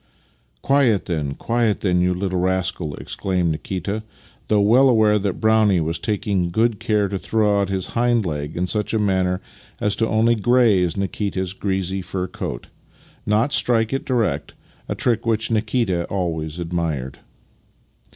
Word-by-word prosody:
"Quiet 135 -7 +3
then, 75 -5 -2
quiet 115 -3 0
then, 90 -3 +2
you 90 0 +1
little 95 0 -2
rascal!" 90 -4 -1
ex - - -6
claimed 90 -3 0
Nikita, 95 +6 -3 0.5
though 105 - +3
well 120 +7 +5
aware 110 -3 +4
that 100 -2 -2
Brownie 110 -4 +3
was 80 +1 -1
taking 100 -2 -1
good 110 +3 +1
care 105 -2 +1
to 95 0 -3
throw 105 -2 +1
out 100 - -1
his 95 -2 -2
hind 120 -2 +2
leg 75 -1 -4
in 90 - 0
such 105 +3 -2
a - - +2
manner 95 -2 +1 0.4
as 105 +2 -1
only 115 +1 +3
to 110 - -7
graze 105 -8 +3
Nikita's 95 -1 -2
greasy 95 -1 -2
fur 90 0 -3
coat, - - -6 0.6
not 110 +6 +2
strike 115 -1 +2
it 135 - -1
direct 110 - -1 0.2
— - - -32
a - - -1
trick 120 -2 0
which 110 0 0
Nikita 110 -5 0
always 80 -5 -3
admired. 80 -6 -3
100 Hz, 160 wpm, -21 LUFS, 90-110 Hz, 0.6 s, well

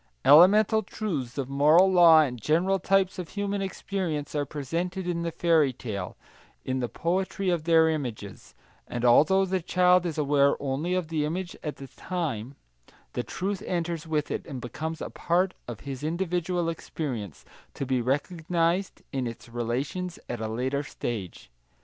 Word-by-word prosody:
Elemental 205 +7 +7
truths 155 - -4
of 135 -2 -2
moral 150 +6 +5
law 170 -4 +7
and 125 -6 -2
general 180 - +2
types 190 +1 +1
of 175 - -5
human 200 -1 -2
experience 185 -6 -3
are 145 -2 -1
presented 175 +7 -3
in 170 -1 -1
the 170 0 -2
fairy 160 -4 +3
tale, 105 -7 -6 0.5
in 130 0 -1
the 120 -2 -2
poetry 185 +2 -1
of 165 -3 -1
their 165 -1 +5
images, 120 -10 -5 0.3
and 120 0 -3
although 160 +11 +5
the 190 0 -1
child 180 +1 +4
is 160 - -4
aware 140 -1 +3
only 145 +6 -1
of 180 -4 -2
the 155 -2 0
image 175 +4 -3
at 150 - -4
the 135 - -9
time, 140 - -4 0.6
the - - -1
truth 195 +1 -3
enters 170 -2 -2
with 155 -2 -1
it - - -2
and 135 -3 -6
becomes 155 +6 -5
a - - -5
part 180 +2 +1
of 120 -3 -7
his 135 -1 -6
individual 175 +1 -1
experience, 120 - -5 0.3
to 140 - -3
be 130 -1 0
recognised 165 +7 -1
in 130 -2 -1
its 115 +1 -9
relations 130 +10 -3
at 120 -2 -4
a 110 - -2
later 130 +5 -1
stage. 110 - -6
160 Hz, 160 wpm, -27 LUFS, 135-180 Hz, 0.6 s, Elemental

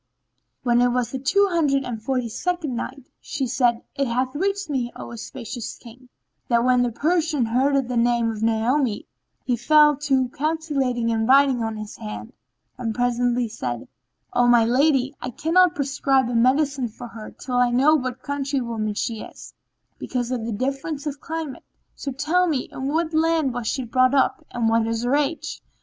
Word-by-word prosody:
When 240 -1 +3
it 245 - +5
was 245 -1 0
the 265 - -3
Two 400 +10 +3
Hundred 290 -5 +2
and 240 -4 -5
Forty 250 0 -1
second 320 +2 -2
Night, 260 +2 -5
She 275 -3 -3
said, 240 -1 +1
It 275 -1 -1
hath 255 +2 -1
reached 395 +5 -1
me, 255 -5 -2
O - - -8
auspicious 235 0 -7
King, 250 +2 -15 0.4
that 235 -1 +3
when 250 0 +4
the 245 -1 +1
Persian 310 0 +1
heard 265 +3 +1
the 250 -1 -2
name 235 -1 +2
of 215 -1 -6
Naomi, 225 +1 +1 0.4
he 250 - +1
fell 300 +4 +5
to 270 -3 +1
calculating 280 -5 -1
and 225 0 0
writing 270 -2 +5
on 225 -1 -2
his 215 -1 -8
hand 105 0 -7 0.5
and 225 -3 -2
presently 245 0 +1
said, 125 - -5 0.5
"O 245 0 +3
my 240 -2 +5
lady, 270 +2 +2
I 250 - -3
cannot 335 +7 +3
prescribe 270 -2 +1
a - - -3
medicine 265 +2 +2
for 235 +2 -10
her 225 -2 -9
till 250 -1 -4
I 245 0 +4
know 265 +6 +4
what 255 -4 -1
country 280 -1 -2
woman 220 -4 -3
she 225 +1 -2
is, - - -11 0.5
because 245 -1 -3
of 245 -3 -2
the - - -2
difference 275 +6 -3
of 285 -1 -4
climate: 315 -5 -5 0.3
so 275 - -5
tell 320 +7 +1
me 285 -6 -1
in 265 - -4
what 320 +2 0
land 320 -4 +2
she 260 +2 -1
was 230 - -11
brought 255 +2 +4
up 265 - +2
and 235 -2 -1
what 225 0 +2
is 230 0 -2
her 245 +3 +2
age." 295 +2 -2
255 Hz, 185 wpm, -23 LUFS, 235-285 Hz, 0.5 s, it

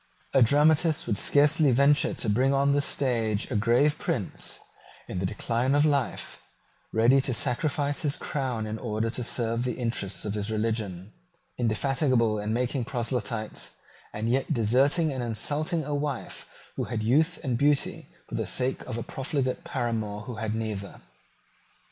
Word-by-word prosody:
A 135 - +5
dramatist 150 +5 +4
would 105 - 0
scarcely 150 +1 +5
venture 140 +4 +3
to - - -3
bring 130 +6 +2
on 140 +1 +3
the 145 - +3
stage 115 -7 0
a - - -1
grave 120 +8 +3
prince, - - -3 0.5
in 90 - -4
the 95 - 0
decline 120 +6 0
of 145 +1 +4
life, 145 -3 -1 0.5
ready 120 +5 +4
to 130 -2 -2
sacrifice 145 +5 -1
his 145 -3 0
crown 130 -6 -3
in 110 +1 -4
order 110 0 -2
to 120 +1 -4
serve 115 0 -1
the 125 -2 -2
interests 115 -6 -2
of 105 - -2
his 105 0 -3
religion, 110 -4 -2 0.5
indefatigable 120 -1 +1
in 105 +1 -2
making 125 +2 0
proselytes, 120 -3 -3 0.4
and 110 +2 -3
yet 130 +3 0
deserting 135 +8 +3
and 130 - -3
insulting 145 +8 -1
a 150 - -3
wife 145 -3 -4 0.3
who - - -1
had 115 -2 -3
youth 155 +9 +2
and 125 -4 -1
beauty 145 -1 +1 0.2
for - - -13
the - - -2
sake 130 +1 -1
of 120 -3 -4
a 115 - -3
profligate 135 +3 -2
paramour 110 -9 -2
who 115 +1 -7
had 110 0 -2
neither. 105 -3 -4
125 Hz, 160 wpm, -27 LUFS, 110-140 Hz, 0.5 s, A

